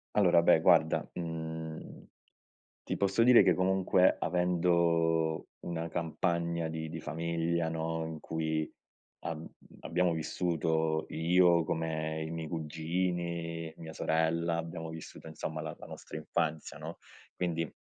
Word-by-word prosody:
Allora, 90 -4 +5
beh, 80 - +6
guarda, 80 -2 +4
mhmm, 80 -1 -6 0.8
ti - - -3
posso 100 +3 +2
dire 125 0 +8
che, - - +5
comunque, 95 0 +3
avendo 85 -2 +2
una 85 -1 -3
campagna 85 0 -1
di 80 0 -4
di 80 +1 -6
famiglia, 85 +1 -1
no, 80 0 -2
in 80 -1 -6
cui 80 -1 -2 0.5
ab 80 -1 -5 0.4
abbiamo 90 +1 +1
vissuto 80 -1 0
io, 85 +1 +4
come 80 -1 -2
i - - -6
miei 80 -1 -4
cugini, 85 +1 -2
mia 80 -1 -8
sorella 80 +1 +1
abbiamo 80 0 -5
vissuto 80 0 -9
insomma 80 0 -5
la 80 0 -5
la - - -10
nostra - - -9
infanzia, 80 -1 -2
no? - - -7 0.4
Quindi, 85 -3 -1
80 Hz, 125 wpm, -31 LUFS, 80-85 Hz, 0.8 s, dire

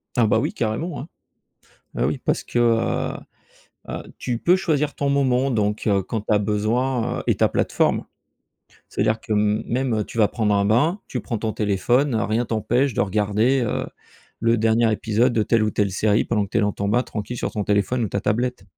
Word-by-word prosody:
Ah, 120 - +4
bah, 110 +1 +3
oui, - - -2
carrément, 120 +9 -2
hein. 150 - -8 0.9
Bah, - - 0
oui, - - -1
parce - - -1
que, 120 - -2
heu 115 -1 +1 0.7
heu, - - -5 0.2
tu 120 -2 -2
peux 180 +7 +4
choisir 150 -6 0
ton 140 - -1
moment, 135 -1 +2
donc 105 -3 -1
heu, 100 -2 +2
quand 110 +3 -3
tu 110 - -1
as 105 - +4
besoin, 115 +4 0
heu, - - -5
et - - +3
ta - - +3
plateforme. - - +1 0.8
C'est - - -4
à - - +4
dire 110 +1 +1
que 110 - -3
m 105 +1 +1
même, 125 0 0
heu, 105 - 0
tu - - -10
vas 105 -2 +5
prendre 105 -3 0
un 100 0 +2
bain, 150 - +2
tu 125 - -3
prends 115 - -3
ton 110 0 -3
téléphone. 115 +6 +1
Rien 110 +2 0
t'empêche 120 +4 0
de - - +1
regarder, 105 +6 +1
heu, 115 - -1 0.5
le 115 +1 +2
dernier 110 +1 +3
épisode 115 +3 +1
de 110 - +2
telle 115 -1 +2
ou 105 - +1
telle 100 -2 0
série 105 +3 +2
pendant 105 -3 0
que - - -15
tu - - -1
es - - +3
dans 105 0 +1
ton 100 - -3
bain, 120 +3 +2
tranquille, 105 +2 -5
sur - - -3
ton 105 -2 -2
téléphone 105 +5 +1
ou 105 - -2
ta 100 - -2
tablette. 120 0 -1
115 Hz, 220 wpm, -22 LUFS, 105-125 Hz, 0.9 s, vas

